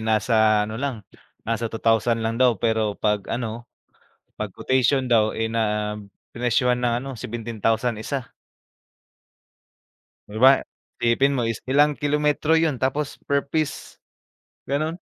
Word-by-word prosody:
nasa 110 -1 +2
ano 110 +3 -6
lang, 130 -7 -3 0.4
nasa 115 0 -2
2,000 115 +1 +1
lang 115 +2 -2
daw 125 -3 +4
pero 110 -1 0
'pag 105 -2 -1
ano, 115 0 -4 0.7
pag 105 - -5
quotation 130 +5 +1
daw, 115 -3 +3
eh, 110 - 0
na, 105 -2 -1 0.4
prinesyuhan 125 +1 +1
ng 120 -1 +1
ano 135 - -5
17,000 115 0 -2
isa. 135 +1 -3 2.0
Di 105 - -9
ba? 130 +4 +6 0.4
Isipin 120 +4 +3
mo 120 -4 0
is 115 - -2
ilang 145 +2 +3
kilometro 150 +1 +1
yun 160 -4 +3
tapos 135 +3 -2
per 140 0 0
piece, 155 -1 -3 0.7
ganon? 155 +4 -2
120 Hz, 125 wpm, -23 LUFS, 110-135 Hz, 2.0 s, ba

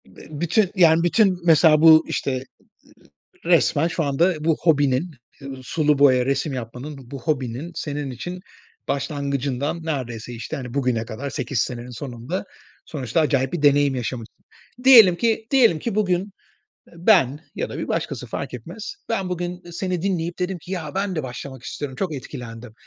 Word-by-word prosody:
Bü 95 - -15
bütün, 180 +3 +2
yani, 165 -3 +5
bütün 185 +1 +3
mesela 155 -2 +6
bu, 160 0 +8
işte, 140 - -2
ııı, 130 0 -7 0.8
resmen 165 -2 +3
şu 170 - -2
anda 165 +6 +2
bu 160 -1 +3
hobinin, 145 0 +2 0.3
eee, 135 - -7
sulu 150 +2 +1
boya 130 -3 +5
resim 135 +2 0
yapmanın, 125 +4 -6
bu 140 -2 -7
hobinin 140 +1 -2
senin 145 -3 -4
için 175 +8 -6 0.5
başlangıcından 140 +1 -2
neredeyse, 125 -7 -4
işte, 115 +6 -6
hani, 125 -3 -7
bugüne 125 -5 0
kadar 130 +6 -6
8 130 -2 -2
senenin 120 0 -4
sonunda 125 - -5 0.4
sonuçta 135 -1 -1
acayip 135 -4 +1
bir 175 - -3
deneyim 145 -1 +4
yaşamışsın. 120 -2 -6 0.4
Diyelim 225 -9 +9
ki, 225 +1 0
diyelim 235 - +5
ki 230 +5 -3
bugün, 185 -4 +2 0.7
eee, - - -20
ben 165 - +4 0.2
ya - - -3
da - - -6
bir - - -4
başkası, - - -3
fark - - -5
etmez. 175 - -7
Ben 195 -5 -1
bugün, 180 0 -4
eee, 175 - -10
seni 180 0 -3
dinleyip 175 -2 -2
dedim 180 +1 -2
ki, 180 - -10
“Ya, 170 -4 -5
ben 195 -1 -1
de 155 - -2
başlamak 130 +1 -8
istiyorum, 135 0 -6
çok 185 -5 -1
etkilendim.” 120 -4 -9
150 Hz, 165 wpm, -22 LUFS, 130-175 Hz, 0.8 s, Diyelim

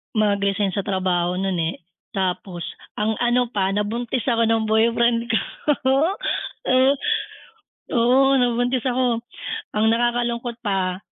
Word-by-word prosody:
mag-resign 200 -2 +1
sa 200 - -1
trabaho 180 -2 0
nun 195 -1 -1
eh, 160 - -2 0.4
tapos 185 -2 -3 0.4
ang 220 +1 +1
ano 245 +1 +2
pa, 195 -1 +1
nabuntis 225 +4 -2
ako 230 -3 +2
ng 225 0 +2
boyfriend 230 +2 +2
ko. 225 - +2 0.5
Oo 295 +7 +3 1.8
oo 260 +3 +4
nabuntis 245 0 +1
ako, 250 -2 +1 0.6
ang 215 +1 +2
nakakalungkot 240 0 0
pa, 190 -2 -1
225 Hz, 115 wpm, -22 LUFS, 195-240 Hz, 1.8 s, oo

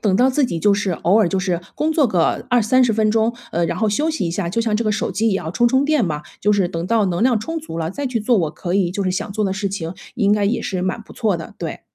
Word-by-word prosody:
等 200 -3 +1
到 255 +5 +4
自 275 +2 +2
己 200 -10 -2
就 205 +1 +4
是， 200 -1 -1
偶 180 +5 +2
尔 210 -6 +3
就 190 - -1
是 180 -3 -1 0.2
工 315 +1 +1
作 300 -4 +3
个 175 -6 0
20-30 245 0 +3
分 215 0 +2
钟， 225 +2 +1 0.2
呃， 170 +1 +1
然 - - -3
后 220 - +1
休 295 +10 +1
息 305 - -2
一 - - -2
下， 170 0 -2
就 215 +6 -1
像 220 -2 +1
这 230 - -1
个 215 - +1
手 210 - -1
机 215 +5 +1
一 - - +1
样 165 -4 -3
充 240 +5 +3
充 265 +3 +3
电 300 -5 +2
嘛， 150 -4 -3 0.2
就 210 - +3
是 195 -3 +2
等 170 -1 -4
到 215 0 +2
能 175 +2 -1
量 245 -2 +3
充 325 +9 -4
足 300 - -7
了 160 0 -2
再 280 +8 -4
去 250 -2 -1
做， 235 +3 +2
我 160 -4 0
可 175 +3 -4
以 190 -3 +2
就 200 +3 -2
是 185 - +1
想 200 +2 -3
做 215 +1 -1
的 190 - 0
事 200 +1 -2
情， 185 -3 -5 0.2
应 205 -3 +2
该 210 -1 +2
也 210 +5 +1
是 185 -2 -3
蛮 185 +5 -2
不 - - -15
错 215 -6 0
的， 165 - -9
对。 - - -5
205 Hz, 325 characters per minute, -20 LUFS, 185-230 Hz, 0.2 s, 到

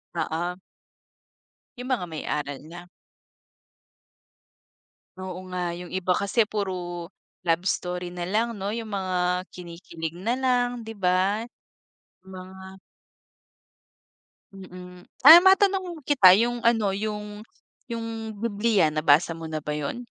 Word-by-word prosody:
Oo. 175 +3 -2 1.2
'Yong 250 +2 -6
may 175 -10 -3
mga - - -9
aral 145 -2 -3
na. 175 +2 -11 2.3
Oo 185 -1 -6
nga, 180 0 -5 0.2
'yong 180 +1 -8
iba 185 -1 -1
kasi 200 +5 +2
puro 180 -5 -4 0.4
love 165 +1 +2
story 180 -1 -2
na 175 -1 -5
lang, 225 +5 0
no? 195 - -3
'Yong 225 -2 -6
mga 180 0 -1
kinikilig 170 -2 -8
na 230 +6 -1
lang, 245 -2 0
'di 225 - -8
ba, 190 +4 +1 0.8
mga 190 0 -11 1.7
Mm, 180 -1 -11 0.2
ah, 325 +4 +12
matanong 380 -3 +3
kita, 190 -11 +7
'yong 240 +1 0
ano, 225 -4 +2
'yong 210 0 -4 1.0
Bibliya, 210 -5 +1
nabasa 155 +2 +3
mo 165 -1 -8
na 155 - -3
ba 150 - -3
'yon? 150 +6 -4
185 Hz, 115 wpm, -25 LUFS, 175-225 Hz, 2.3 s, ah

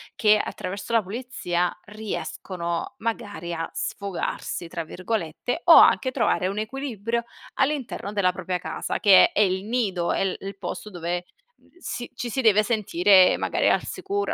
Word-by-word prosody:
che 215 -2 +5
attraverso 200 +1 -4
la 225 -3 +4
pulizia 185 -5 -2
riescono 190 -2 -5
magari 205 -7 -4
a 165 0 -3
"sfogarsi" 195 -3 -4
tra 165 0 -5
virgolette 185 - -3
o 340 - +9
anche 260 - +6
trovare 195 -6 +1
un 195 +2 -4
equilibrio 235 -1 -3 0.4
all'interno 270 -7 -1
della 190 -3 +2
propria 185 0 -3
casa 180 - -4
che 200 -4 +7
è - - -19
è - - +3
il 190 -1 +1
nido, 200 -7 0
è - - +1
l 190 - -1
il 195 +1 -7
posto 210 - -6
dove, 175 -1 -4 0.3
uhm, - - -28
si 245 -8 -6
ci 240 -1 -4
si 265 - 0
deve 215 -3 +5
sentire 195 -4 +4
magari - - +1
al - - +2
sicuro, 405 +1 -3
205 Hz, 160 wpm, -24 LUFS, 180-235 Hz, 0.4 s, o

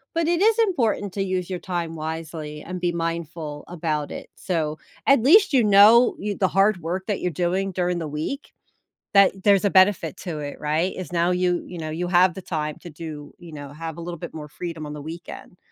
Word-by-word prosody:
but 330 -1 +1
it 345 +1 +1
is 445 +1 +4
important 235 - +1
to 195 - -2
use 185 -2 -2
your 185 -2 -4
time 170 -3 -4
wisely 155 -1 -6
and 180 0 -6
be 175 -1 +1
mindful 165 -3 -4
about 155 -4 -2
it, - - -8
so, 155 -4 -2 0.3
at 275 -4 +5
least 375 - +6
you 250 -4 +5
know 210 +4 +7
you 205 -1 -3
the 190 - +2
hard 195 +1 +3
work 180 +4 -3
that 205 -3 -2
you're 180 - 0
doing 185 +4 -1
during 180 -1 -1
the 160 - -4
week, 155 - -5 0.6
that 195 -1 +4
there's 200 -1 +5
a 200 - +3
benefit 190 0 +3
to 160 -5 -5
it, 145 -1 -7
right? 155 +5 0
It's 185 -1 -7
now 170 0 +1
you 180 -1 +1
you 175 - -8
know, 155 -1 -4
you 170 +3 -3
have 180 -1 +4
the 190 - -8
time 155 -3 -3
to 175 - -10
do, 150 -1 -8
you 170 -2 -12
know 145 -2 -8
have 165 +1 -6
a 170 - -7
little 170 -1 -6
bit 170 -1 -8
more 150 -1 -7
freedom 165 0 -6
on 150 - -6
the 150 - -7
weekend. 170 +2 -9
175 Hz, 220 wpm, -23 LUFS, 160-195 Hz, 0.6 s, know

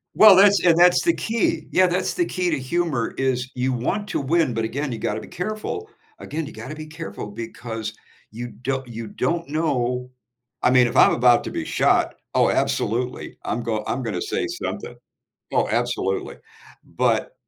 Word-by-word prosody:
Well, 215 -3 +9
that's 200 0 +6
and 170 -2 +5
that's 175 0 +6
the 335 -1 +3
key, 220 -8 -1
yeah, 185 0 +5
that's 180 +1 0
the 355 - +1
key 180 - -1
to 150 - +1
humor 140 -3 -1
is 130 -1 -1
you 130 +1 -1
want 195 - -2
to - - -1
win, 155 -2 +1
but, 115 0 -1
again, 135 +4 -2
you - - -4
gotta 105 0 -2
be - - -10
careful 215 - -4 0.3
again, 160 0 -4
you 155 - -9
gotta 155 - -7
be 155 0 -8
careful 160 -8 -7
because 110 0 -6 0.4
you 120 +2 -6
do 130 +2 -3
you 115 -1 -7
don't 170 +10 -2
know 125 -5 -1 0.5
I 125 - +4
mean, 125 -1 +5
if - - -5
I'm - - +7
about 120 -1 +4
to - - -4
be - - -3
shot, - - +2 0.2
oh, - - +4
absolutely, 125 +3 -1
I'm 120 - -2
go 110 -2 -2
I'm 130 - -1
gonna 115 - -3
say 415 -2 -2
something. 350 +2 -5 0.6
Oh, - - +2
absolutely. - - -1 0.5
But - - 0
135 Hz, 180 wpm, -23 LUFS, 120-180 Hz, 0.6 s, Well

